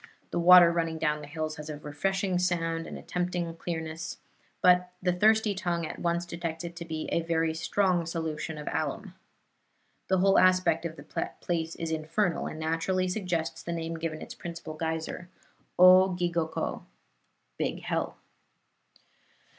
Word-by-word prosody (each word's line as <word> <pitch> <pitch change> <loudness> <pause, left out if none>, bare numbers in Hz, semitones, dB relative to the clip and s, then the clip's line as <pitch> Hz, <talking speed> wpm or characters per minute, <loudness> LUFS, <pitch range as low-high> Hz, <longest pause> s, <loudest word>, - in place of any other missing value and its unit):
The - - 0
water 175 0 +9
running 165 -1 -1
down 150 -1 0
the 145 - -9
hills 155 +1 -4
has 150 +1 -7
a 150 - -5
refreshing 185 +6 -1
sound 165 -2 0
and - - -7
a - - -11
tempting 175 -2 -2
clearness, 160 -1 -5 0.4
but 180 0 +5
the 180 -1 +1
thirsty 215 +3 +4
tongue 175 -3 -1
at - - -7
once 170 0 0
detects 170 -1 -5
it 170 0 -6
to 170 - -6
be 160 -1 -4
a 170 - +2
very 165 -1 0
strong 175 +1 +1
solution 160 -1 -3
of 150 - -8
alum. 165 +6 -3 0.9
The 190 - +3
whole 195 +1 +5
aspect 185 -3 +3
of 165 -1 -4
the - - -4
place 165 -2 -2
is 165 -1 -4
infernal, 165 +4 0
and 155 - -6
naturally 165 +4 0
suggests 180 -4 -2
the 170 - -4
name 165 0 -3
given 160 -1 -4
its - - -8
principal 170 -2 -7
geyser, 160 +2 -4 0.5
O 185 +1 +8
gigoko 170 -2 -1 0.8
(Big - - -2
Hell). - - -2
170 Hz, 155 wpm, -29 LUFS, 160-180 Hz, 0.9 s, water